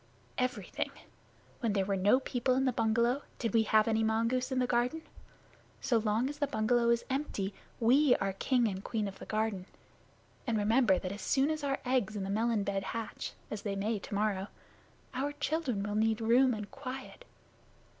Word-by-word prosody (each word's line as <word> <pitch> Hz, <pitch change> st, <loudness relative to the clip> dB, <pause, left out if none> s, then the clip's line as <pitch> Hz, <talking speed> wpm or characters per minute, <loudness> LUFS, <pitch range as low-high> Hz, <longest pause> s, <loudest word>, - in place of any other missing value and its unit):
"Everything. 255 Hz, +1 st, -2 dB, 0.7 s
When 230 Hz, -5 st, 0 dB
there 195 Hz, -2 st, +1 dB
were 200 Hz, 0 st, 0 dB
no 200 Hz, +7 st, +4 dB
people 255 Hz, -1 st, 0 dB
in 265 Hz, +1 st, +2 dB
the 260 Hz, -, +3 dB
bungalow, 235 Hz, +4 st, +2 dB, 0.2 s
did 230 Hz, -1 st, -2 dB
we 225 Hz, -, +5 dB
have 215 Hz, 0 st, +3 dB
any 225 Hz, 0 st, +2 dB
mongoose 230 Hz, +4 st, +1 dB
in 260 Hz, -, 0 dB
the 255 Hz, -, +3 dB
garden? 245 Hz, +6 st, 0 dB, 0.8 s
So 235 Hz, -3 st, +2 dB
long 220 Hz, +3 st, +1 dB
as 290 Hz, +1 st, -6 dB
the 285 Hz, -, +1 dB
bungalow 235 Hz, +1 st, +2 dB
is 235 Hz, 0 st, +2 dB
empty, 260 Hz, -8 st, -2 dB, 0.3 s
we 255 Hz, +3 st, +5 dB
are 195 Hz, 0 st, -1 dB
king 245 Hz, +4 st, +2 dB
and 195 Hz, -1 st, -4 dB
queen 215 Hz, -3 st, -2 dB
of 195 Hz, -, -8 dB
the -, -, -9 dB
garden; 215 Hz, -4 st, -1 dB, 0.8 s
and 230 Hz, -2 st, +1 dB
remember 215 Hz, -1 st, +4 dB
that 185 Hz, -, -4 dB
as 200 Hz, -, -6 dB
soon 275 Hz, +3 st, +2 dB
as 310 Hz, -1 st, -3 dB
our 275 Hz, -1 st, 0 dB
eggs 245 Hz, -5 st, +1 dB
in 200 Hz, -, -2 dB
the 195 Hz, -, -3 dB
melon 220 Hz, 0 st, +1 dB
bed 195 Hz, -1 st, -1 dB
hatch 225 Hz, +3 st, -5 dB, 0.2 s
(as 215 Hz, -, -4 dB
they 200 Hz, -2 st, -3 dB
may 210 Hz, +2 st, -1 dB
tomorrow), 200 Hz, -1 st, -1 dB, 0.7 s
our 275 Hz, +3 st, -2 dB
children 290 Hz, -8 st, -1 dB
will 205 Hz, 0 st, -3 dB
need 220 Hz, +1 st, +2 dB
room 240 Hz, +2 st, +4 dB
and 210 Hz, -1 st, -7 dB
quiet." 265 Hz, -, -7 dB
230 Hz, 185 wpm, -32 LUFS, 210-255 Hz, 0.8 s, we